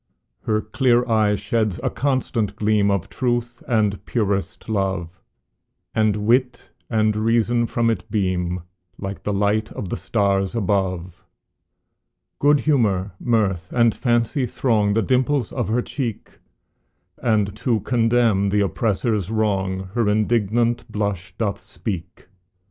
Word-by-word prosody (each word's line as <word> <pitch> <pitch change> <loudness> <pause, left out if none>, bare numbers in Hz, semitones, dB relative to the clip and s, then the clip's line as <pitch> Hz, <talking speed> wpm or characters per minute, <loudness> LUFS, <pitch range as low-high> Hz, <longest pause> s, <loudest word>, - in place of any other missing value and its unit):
Her 110 -1 +2
clear 120 +2 +2
eye 110 -3 +3
sheds 105 0 -1
a - - 0
constant 120 -7 -1
gleam 105 -1 +2
Of 100 -1 0
truth 120 -1 -2
and 105 -4 +1
purest 100 -4 -1
love, 95 -5 -2 0.7
And 105 -1 +1
wit 125 +2 +1 0.2
and 110 -2 +2
reason 115 +2 +2
from 115 0 +1
it 110 - -4
beam, 90 -4 -1 0.4
Like 95 0 -6
the 105 - -2
light 105 +2 +1
of 95 - -5
the - - -2
stars 100 -1 0
above. 90 -4 -1 1.2
Good 145 0 +4
humor, 105 -10 +1
mirth, 100 -7 0
and 115 -2 +3
fancy 120 +2 +1
throng 105 -4 +1
The 115 - +2
dimples 130 -1 +1
of 120 -6 -2
her 120 +3 +1
cheek, 120 -7 -4 0.9
And 105 -4 +1
to 115 -2 0
condemn 115 -4 +2
the 105 +1 +2
oppressor's 105 -1 0
wrong 95 -4 -1
Her 115 -3 +1
indignant 115 +2 +1
blush 100 -4 -3
doth 100 -3 -2
speak. 90 -5 -6
110 Hz, 125 wpm, -22 LUFS, 100-120 Hz, 1.2 s, Good